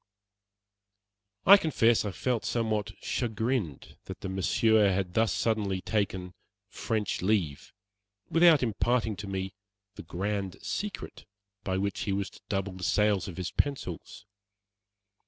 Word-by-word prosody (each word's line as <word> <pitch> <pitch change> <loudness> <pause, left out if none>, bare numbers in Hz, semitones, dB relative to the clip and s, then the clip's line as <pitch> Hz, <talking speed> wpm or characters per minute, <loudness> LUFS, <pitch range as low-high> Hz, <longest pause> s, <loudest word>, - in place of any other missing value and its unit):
I 200 +2 +10
confess 120 - +2
I - - -1
felt 120 +4 -1
somewhat 110 -3 -1
chagrined 110 - -2
that - - -8
the 95 - -4
Monsieur 105 +3 +3
had 90 -1 -1
thus 115 +2 +2
suddenly 105 -4 0
taken 95 -3 -2 0.4
"French 110 -3 -2
leave" 90 -8 0 0.6
without 165 -4 +5
imparting 115 0 +1
to 100 +1 -6
me 95 -1 -3 0.4
the - - -6
"grand 100 0 -3
secret" 205 -1 -5 0.4
by 95 -2 -1
which 100 +1 -1
he 100 - 0
was 100 0 -2
to - - -16
double 95 -1 -1
the 95 0 -9
sales 105 -1 +2
of 90 - -8
his 90 -1 -3
pencils. 105 - -3
105 Hz, 130 wpm, -29 LUFS, 95-115 Hz, 0.6 s, I